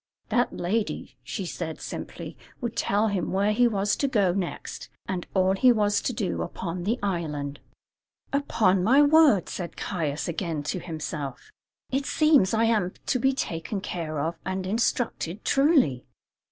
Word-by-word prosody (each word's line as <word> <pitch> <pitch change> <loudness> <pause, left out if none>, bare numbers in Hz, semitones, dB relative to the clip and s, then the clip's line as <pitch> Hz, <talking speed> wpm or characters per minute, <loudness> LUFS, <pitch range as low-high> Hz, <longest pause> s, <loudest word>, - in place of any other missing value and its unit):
That 245 - +2
lady, 205 +5 -2
said 170 -5 -4
she - - -22
simply, - - -7 0.2
would 235 -3 -3
tell 210 +2 +2
him 195 -4 -1
where 200 +2 +2
he 240 +3 +4
was 205 -2 +1
to 280 - +1
go 200 -9 +2
next, 185 -2 -4 0.2
and 185 -2 -3
all 190 0 +4
he 250 +6 +5
was 210 -3 +2
to - - -1
do 210 -6 -2
upon 175 0 -4
the 225 +5 +1
island. 150 -7 -2 0.7
"Upon 210 -10 +2
my 265 +8 +6
word!" 290 - +5
said 175 -2 -6
Caius 155 -6 -2
again 165 -3 -2
to 165 +5 -2
himself, 150 -6 -6 0.4
"it 275 +1 0
seems 305 -11 +4
I 225 0 +2
am 215 -5 +2
to 255 - +1
be 265 +3 +3
taken 195 -6 -3
care 165 -5 -4
of 165 +3 -2
and 190 0 -3
instructed, 215 -3 -1
truly." 275 - +3
195 Hz, 155 wpm, -26 LUFS, 170-230 Hz, 0.7 s, my